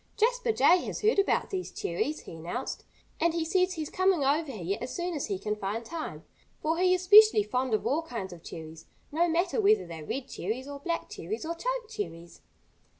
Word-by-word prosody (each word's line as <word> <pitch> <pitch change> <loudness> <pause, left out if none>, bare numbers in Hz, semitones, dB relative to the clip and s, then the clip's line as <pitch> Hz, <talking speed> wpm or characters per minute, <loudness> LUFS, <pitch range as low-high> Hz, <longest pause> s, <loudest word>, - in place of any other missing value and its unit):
"Jasper 485 +2 +2
Jay 350 0 +5
has - - -4
heard 430 -1 +3
about 395 - +1
these 375 -2 -3
cherries," 285 - -2
he - - -10
announced. 175 +11 -5 0.3
"And 335 0 +2
he 330 -1 0
says 365 +2 +2
he's 310 -3 -5
coming 370 -5 +2
over 290 +2 +1
here 195 -4 -3
as 250 - -5
soon 350 0 -2
as 295 - -2
he 195 - -2
can 210 +2 -2
find 210 +3 -3
time, 325 +2 -6 0.4
for 320 +2 0
he 365 0 +4
is 365 - -3
specially 425 +2 +8
fond 255 - 0
of - - -3
all 300 +4 +1
kinds 230 - -6
of 170 - -12
cherries, 160 -1 -9 0.2
no 335 +4 +2
matter 345 +6 +1
whether 425 - +4
they're 165 -2 -8
red 265 - -4
cherries 235 +8 -4
or 285 0 -7
black 335 +3 -2
cherries 435 -6 -5
or 335 - -2
choke - - -3
cherries." 290 - -7
320 Hz, 210 wpm, -29 LUFS, 225-370 Hz, 0.4 s, specially